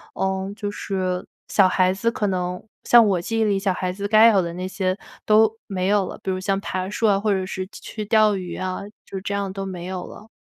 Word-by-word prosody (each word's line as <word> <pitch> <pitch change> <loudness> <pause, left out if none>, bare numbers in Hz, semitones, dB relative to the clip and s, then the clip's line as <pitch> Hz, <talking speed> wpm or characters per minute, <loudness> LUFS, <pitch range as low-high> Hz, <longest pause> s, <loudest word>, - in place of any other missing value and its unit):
呃， 190 0 -1
就 205 -2 -3
是 185 -3 -2 0.2
小 195 -2 +4
孩 185 0 +2
子 215 +5 0
可 220 - -2
能 180 -1 -2 0.2
像 235 -1 +7
我 185 -4 +1
记 225 +5 -2
忆 - - +3
里 200 -2 +1
小 195 -1 +1
孩 180 0 -2
子 200 +2 -4
该 215 +2 +7
有 200 -3 +4
的 170 -1 -4
那 180 +1 -4
些 185 0 -1 0.3
都 220 0 +5 0.2
没 185 -3 -2
有 200 -2 +2
了。 - - -7
比 190 - -1
如 185 - -2
像 195 +1 0
爬 185 -1 -3
树 220 +2 0
啊 200 -2 +3
或 210 +1 0
者 190 -1 0
是 185 0 -4
去 - - -12
去 215 -1 -6
钓 215 -1 +4
鱼 180 -2 -5
啊， 185 0 -3 0.2
就 195 - -6
这 200 0 -3
样 200 -1 -2
都 195 0 -4
没 180 -2 -6
有 185 -1 -4
了。 215 - -12
195 Hz, 265 characters per minute, -23 LUFS, 185-210 Hz, 0.3 s, 像